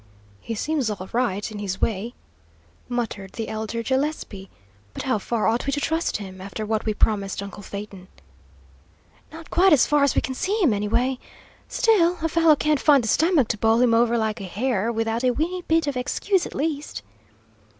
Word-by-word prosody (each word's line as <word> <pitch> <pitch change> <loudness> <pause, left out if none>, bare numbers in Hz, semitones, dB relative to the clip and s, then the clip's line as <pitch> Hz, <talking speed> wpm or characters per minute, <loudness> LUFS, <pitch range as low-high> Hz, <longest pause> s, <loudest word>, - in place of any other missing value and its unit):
"He 225 - -5
seems 285 0 -1
all 190 -3 -5
right, 225 -4 -1
in 210 - -7
his 190 -2 -3
way," 225 +2 -2 0.7
muttered 220 -6 -4
the 225 - -4
elder 220 +1 -3
Gillespie, 260 -7 -2 0.5
"but - - -4
how 255 -5 0
far 230 +2 -1
ought 230 +4 0
we - - +1
to 290 - 0
trust 320 +3 -1
him, 190 -2 -9
after 200 +3 -5
what 215 0 -1
we 215 - +1
promised 200 -2 0
uncle 200 +1 -9
Phaeton?" 200 -2 -8 1.2
"Not 320 +1 -11
quite 370 0 +5
as 280 - +5
far 295 -1 +3
as 280 - +2
we - - +3
can 260 - -3
see 390 +11 -1
him, 275 -10 +4
anyway. 235 +6 0 0.5
Still, 360 -7 +3
a 325 - +1
fellow 325 -1 +5
can't 300 0 +1
find 285 -4 +5
the - - -3
stomach 315 - +3
to 215 - -1
bowl 225 +1 +3
him 245 -2 +4
over 235 +1 +3
like 220 -1 -1
a - - -5
hare, 225 +2 -1
without 225 +1 -1
a 255 - +4
weenty 350 +4 -1
bit 325 -1 +3
of 285 -2 -2
excuse, 360 +9 0
at - - -11
least." 295 0 -3
235 Hz, 190 wpm, -24 LUFS, 210-295 Hz, 1.2 s, quite